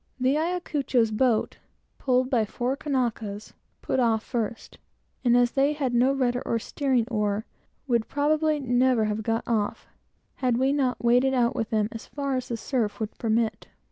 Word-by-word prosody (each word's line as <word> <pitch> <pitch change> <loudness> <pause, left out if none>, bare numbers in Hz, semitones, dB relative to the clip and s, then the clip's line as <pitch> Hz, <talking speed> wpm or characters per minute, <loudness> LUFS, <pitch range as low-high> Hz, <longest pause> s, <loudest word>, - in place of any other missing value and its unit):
The 260 +2 +2
Ayacucho's 300 -8 0
boat, 225 0 +1 0.4
pulled 255 0 +1
by 235 -4 +3
four 245 +5 -2
Kanakas, 235 -8 -3 0.3
put 265 - 0
off 225 -3 +2
first, 230 -2 -4 0.4
and 240 -1 +4
as 245 -1 +3
they 280 +2 +2
had 275 -4 -2
no 245 +3 +4
rudder 250 -2 0
or 230 - 0
steering 255 0 0
oar, 210 -1 0 0.4
would 235 -4 +1
probably 305 +1 +1
never 250 -3 +2
have 210 0 -2
got 225 +1 -1
off, 215 -3 -1 0.5
had 250 -3 +1
we 265 +2 +2
not 255 -5 0
waded 250 +3 +4
out 240 -2 +2
with 225 - -2
them, 215 -2 +1
as 225 - -8
far 280 -2 -3
as 255 -1 -3
the 235 - -3
surf 220 -3 -2
would 220 -1 -4
permit. 220 -1 0
245 Hz, 170 wpm, -26 LUFS, 225-270 Hz, 0.5 s, and